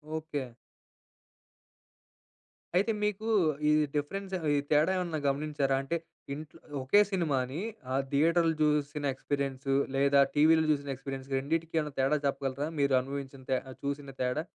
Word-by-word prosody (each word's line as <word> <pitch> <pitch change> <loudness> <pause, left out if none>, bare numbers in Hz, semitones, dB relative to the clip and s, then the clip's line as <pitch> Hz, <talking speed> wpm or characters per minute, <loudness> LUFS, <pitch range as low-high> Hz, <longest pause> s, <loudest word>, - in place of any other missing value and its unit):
Okay. 150 -5 -4 2.2
అయితే 200 +5 +3
మీకు, 210 +1 -1 0.4
ఈ - - +5 0.2
డిఫరెన్స్ 190 +7 -3 0.2
ఈ - - +3
తేడా 155 +5 +4
ఏమైనా 170 -4 -2
గమనించారా? 140 -1 0
అంటే, 165 +5 -2 0.4
ఇంట్లో 150 +1 -9 0.2
ఒకే 170 +11 +5
సినిమాని, 145 -4 0 0.3
ఆ - - +1 0.2
థియేటర్‌లో 165 +3 +3
చూసిన 150 -1 +1
ఎక్స్‌పీరియన్సు 135 0 -2 0.2
లేదా 140 +1 +4 0.2
టీవీ‌లో 160 +2 +5
చూసిన 140 -1 -1
ఎక్స్‌పీరియన్స్‌కి 135 0 -5
రెండిటికి 165 +4 -2
ఏమైనా 150 -2 -3
తేడా 135 +3 +3
చెప్పగలరా? 135 +1 -2
మీరు 140 -1 +3
అనుభవించిన 135 0 -6
తె 130 - +3 0.3
చూసిన 140 0 -3
తేడా. 125 +5 0
145 Hz, 125 wpm, -30 LUFS, 135-160 Hz, 2.2 s, ఈ